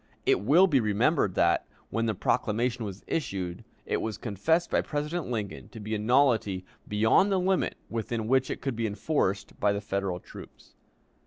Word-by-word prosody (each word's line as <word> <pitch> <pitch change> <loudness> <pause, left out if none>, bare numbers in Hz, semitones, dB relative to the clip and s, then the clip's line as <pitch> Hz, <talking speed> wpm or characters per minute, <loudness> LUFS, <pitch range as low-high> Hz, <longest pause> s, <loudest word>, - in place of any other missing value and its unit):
It - - +3
will 150 - +6
be 150 -8 +3
remembered 105 -3 +2
that, - - +2 0.2
when 115 0 0
the 110 - 0
proclamation 115 +5 0
was 100 -1 -7
issued, 95 - -3 0.2
it - - 0
was 110 -1 -3
confessed 160 - 0
by - - +3
President 150 +3 -3
Lincoln 110 -5 -4
to 115 - -10
be 110 +1 -5
a 110 - 0
nullity 110 -5 +2 0.2
beyond 110 - +3
the 190 - +3
limit 185 0 +1
within 115 -1 -3
which 130 +1 +2
it - - -4
could 135 -3 -2
be 115 0 -1
enforced 105 -2 -1
by 105 - +3
the 100 - -1
Federal 100 -3 -2
troops. - - -13
110 Hz, 175 wpm, -28 LUFS, 105-140 Hz, 0.2 s, will